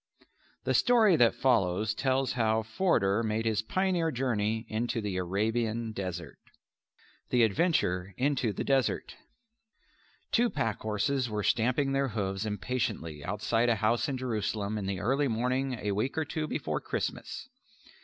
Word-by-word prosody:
The - - 0
story 225 -7 +5
that 120 -2 +4
follows 110 -5 +2
tells 130 +3 0
how 110 -2 +1
Forder 110 - +1
made 110 0 -1
his 110 -1 +1
pioneer 180 - 0
journey 115 -5 -1
into 115 +2 -1
the 100 -4 -3
Arabian 110 +5 -1
desert. 90 -6 -5 0.9
The 120 -1 +4
Adventure 95 - +1
into 130 -4 +1
the 100 - -3
Desert 135 -2 0 1.2
Two 240 +1 +3
pack 115 - -2
horses 120 +4 0
were 105 -1 -2
stamping 125 +6 +2
their 135 0 +1
hoofs 100 -3 -2
impatiently 105 - -3
outside 115 +4 0
a 115 - +3
house 110 +5 +1
in 135 - -2
Jerusalem 110 -4 -2
in 95 - -4
the 95 -2 -2
early 135 +8 +1
morning 125 +3 0
a 105 -4 -2
week 110 +9 -1
or 160 - +1
two 155 +1 -3
before - - -2
Christmas. - - -4
115 Hz, 145 wpm, -29 LUFS, 105-130 Hz, 1.2 s, story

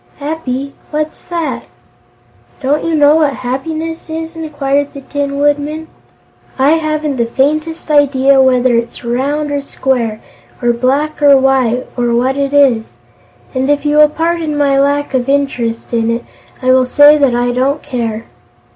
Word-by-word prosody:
"Happy? 280 -2 -4 0.2
What's 305 0 -4
that?" 340 -3 -3 0.9
"Don't 285 +3 0
you 330 -1 0
know 295 +1 +5
what 295 -4 +1
happiness 320 +6 -4
is?" 325 +1 -5
inquired 285 -3 -2
the 280 - -7
Tin 280 0 -3
Woodman. 290 +2 -1 0.7
"I 270 +2 +3
haven't 310 -3 -1
the 235 -1 0
faintest 310 +6 -1
idea 275 -2 +4
whether 255 -2 +3
it's 235 +1 -3
round 285 +5 -1
or 285 0 -1
square, 245 -5 -2 0.4
or 240 -1 +1
black 275 +6 -1
or 285 -1 +6
white, 260 -2 +1
or 240 -1 0
what 255 +3 +1
it 280 -1 -1
is. 265 -6 +2 0.6
And, 265 +1 -1
if 290 0 +1
you 295 0 +2
will 300 0 +6
pardon 325 -1 -2
my 280 -1 +2
lack 285 0 0
of 255 0 0
interest 250 -5 -1
in 230 -1 +1
it, 230 +1 -2 0.4
I 255 - +3
will 255 -1 +3
say 290 +3 +6
that 270 -4 +2
I 245 0 0
don't 270 +4 -1
care." 230 -4 -4
280 Hz, 155 wpm, -14 LUFS, 255-300 Hz, 0.9 s, or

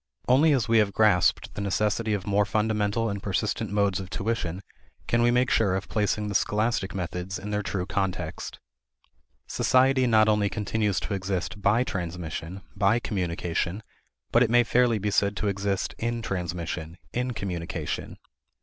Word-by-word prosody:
Only 145 +5 +5
as 130 -5 +2
we 115 -1 +4
have 100 -2 +2
grasped 105 -5 +3
the - - -5
necessity 105 +2 0
of 95 -2 -5
more 100 0 +2
fundamental 105 +1 0
and 100 -2 -3
persistent 100 -1 -1
modes 100 -2 +1
of 95 -1 -7
tuition 95 -4 -2 0.4
can 115 - +2
we 120 - +4
make 125 +1 +2
sure 100 -4 +3
of 95 - -3
placing 105 -1 0
the 105 - -3
scholastic 105 0 0
methods 90 +1 -4
in 105 +2 -6
their 105 0 0
true 95 -3 -3
context. 95 -2 -3 0.9
Society 130 0 +3
not 110 -2 +5
only 105 -1 +2
continues 105 -1 -1
to 105 - -3
exist 95 +1 -3
by 105 +5 +3
transmission, 90 -2 -5
by 105 +3 +3
communication, 90 -2 -2 0.5
but 115 - +4
it 120 - +4
may 120 +1 +5
fairly 120 -1 +3
be 105 0 -1
said 100 0 +1
to 105 - -1
exist 100 -1 -1
in 115 0 -2
transmission, 85 -3 -4 0.2
in 125 +1 -1
communication. 90 -6 -4
100 Hz, 160 wpm, -26 LUFS, 95-110 Hz, 0.9 s, Only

